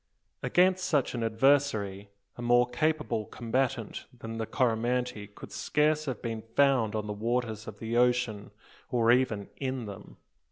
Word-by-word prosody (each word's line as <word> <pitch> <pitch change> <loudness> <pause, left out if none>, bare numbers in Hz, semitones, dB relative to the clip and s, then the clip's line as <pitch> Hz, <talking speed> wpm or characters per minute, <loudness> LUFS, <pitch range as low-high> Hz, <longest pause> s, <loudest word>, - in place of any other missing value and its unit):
Against 185 +1 +3
such 150 -7 +1
an 120 - -3
adversary 110 -4 +2 0.3
a - - -8
more 120 +1 +4
capable 125 -4 0
combatant 120 -1 -2
than 115 -1 -6
the 110 - -2
Coromantee 120 -2 0
could 100 - -12
scarce 155 +1 +1
have 130 -6 -4
been 115 -2 -3
found 130 -7 +3
on 105 -1 -2
the 105 - -3
waters 110 0 -2
of 105 -1 -8
the 115 +2 -4
ocean, 120 -4 +1 0.4
or 120 -1 +3
even 120 -5 +1
in 130 -3 -3
them. 100 -1 -10
120 Hz, 150 wpm, -29 LUFS, 110-130 Hz, 0.4 s, more